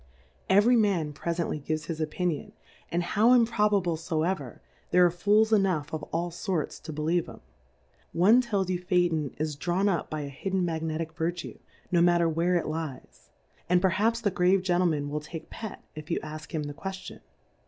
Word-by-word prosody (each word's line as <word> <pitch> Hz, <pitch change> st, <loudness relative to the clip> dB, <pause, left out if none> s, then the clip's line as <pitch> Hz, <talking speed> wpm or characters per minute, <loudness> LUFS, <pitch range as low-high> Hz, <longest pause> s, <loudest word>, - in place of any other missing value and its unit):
Every 205 Hz, +6 st, +5 dB
Man 190 Hz, -9 st, +1 dB
prefently 170 Hz, -2 st, -3 dB
gives 155 Hz, +1 st, -2 dB
liis 160 Hz, -1 st, -4 dB
Opinion, 155 Hz, 0 st, -2 dB, 0.4 s
and 175 Hz, +2 st, 0 dB
how 215 Hz, +7 st, +4 dB
improbable 210 Hz, -7 st, +3 dB
foever, 160 Hz, -4 st, -2 dB, 0.3 s
there 180 Hz, 0 st, +5 dB
are 175 Hz, -, +3 dB
Fools 210 Hz, +5 st, +3 dB
enough 180 Hz, -8 st, +1 dB
of 155 Hz, -, -2 dB
all 170 Hz, +1 st, -1 dB
forts 170 Hz, -1 st, -3 dB
to 160 Hz, -, -8 dB
believe 160 Hz, +3 st, 0 dB
'em: -, -, -12 dB, 0.7 s
One 210 Hz, +9 st, +5 dB
tells 200 Hz, -6 st, -1 dB
you 180 Hz, -, -1 dB
Phaeton 175 Hz, -5 st, 0 dB
is 155 Hz, -1 st, -2 dB
drawn 175 Hz, +6 st, 0 dB
up 175 Hz, -6 st, 0 dB
by 155 Hz, -1 st, -3 dB
a 140 Hz, -, -5 dB
hidden 185 Hz, +6 st, -2 dB
Magnetick 160 Hz, -1 st, -3 dB
Vertue, 170 Hz, +1 st, -4 dB, 0.3 s
no 175 Hz, -1 st, +4 dB
matter 175 Hz, -1 st, +4 dB
where 165 Hz, +3 st, +1 dB
it 175 Hz, -, +1 dB
lies; 155 Hz, -4 st, -6 dB, 0.4 s
and 180 Hz, 0 st, +5 dB
perhaps 205 Hz, +6 st, +1 dB
the 205 Hz, -3 st, +1 dB
grave. 180 Hz, +1 st, +3 dB
Gentleman 175 Hz, -5 st, +1 dB
will 150 Hz, +1 st, -2 dB
take 160 Hz, +1 st, -9 dB
Pet, 220 Hz, -3 st, -7 dB
if 155 Hz, -1 st, -9 dB
you 170 Hz, -, 0 dB
ask 155 Hz, 0 st, -8 dB
him 155 Hz, -2 st, -2 dB
the 145 Hz, 0 st, -5 dB
Qtieftion. 190 Hz, +5 st, -7 dB
175 Hz, 175 wpm, -28 LUFS, 155-190 Hz, 0.7 s, Every